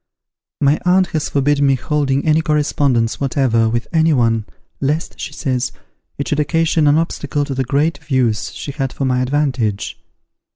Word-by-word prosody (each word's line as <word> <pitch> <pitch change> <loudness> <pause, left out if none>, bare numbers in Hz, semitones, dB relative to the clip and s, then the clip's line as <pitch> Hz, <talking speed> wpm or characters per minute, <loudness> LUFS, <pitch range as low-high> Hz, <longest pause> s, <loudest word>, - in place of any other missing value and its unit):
My 145 +1 +3
aunt 180 0 +3
has 155 -2 -1
forbid 145 +1 +1
me 135 -1 +4
holding 140 0 -1
any 155 0 +3
correspondence 145 -7 +1
whatever, 125 -5 +2
with 120 +1 -2
any 160 -1 +3
one, 115 -4 +1 0.3
lest, 150 +4 -2
she - - -5
says, 130 -4 -2 0.5
it 140 - -3
should 150 - 0
occasion 160 0 +2
an 145 +1 +5
obstacle 145 -3 -1
to 140 - -4
the 130 0 -1
great 145 +6 0
views 125 -7 0
she 140 - -6
has 135 -2 -3
for 135 - -2
my 125 -1 +1
advantage. 125 -6 -1
140 Hz, 165 wpm, -18 LUFS, 130-150 Hz, 0.5 s, an